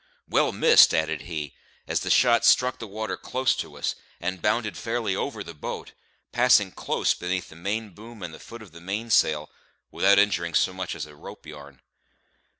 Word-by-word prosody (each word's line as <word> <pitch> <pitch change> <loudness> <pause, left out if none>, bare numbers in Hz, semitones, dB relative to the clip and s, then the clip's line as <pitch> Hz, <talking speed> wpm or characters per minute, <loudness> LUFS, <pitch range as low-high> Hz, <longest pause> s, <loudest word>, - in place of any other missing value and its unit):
"Well - - +2
missed!" - - +6
added 80 -2 -1
he, 75 -4 -5 0.3
as - - 0
the - - -4
shot 120 -2 +4
struck 125 0 +4
the 115 - -7
water 110 +2 -4
close 130 0 0
to - - -6
us, - - -1 0.3
and 90 +1 -4
bounded 110 +2 0
fairly 115 -4 -2
over 110 -2 -3
the 85 - -9
boat, 75 - -7 0.4
passing 120 -6 +4
close - - 0
beneath 90 0 -3
the - - -14
main 105 +5 -3
boom 110 +2 -12
and 85 - -6
the - - -11
foot 115 -1 -11
of 100 - -15
the 85 +1 -13
mainsail, 95 -6 +1 0.4
without 100 +1 +4
injuring 85 -5 +2
so 95 - +2
much 95 0 -5
as 75 - -5
a 75 - -14
ropeyarn. 70 -2 -12
95 Hz, 180 wpm, -25 LUFS, 80-110 Hz, 0.4 s, missed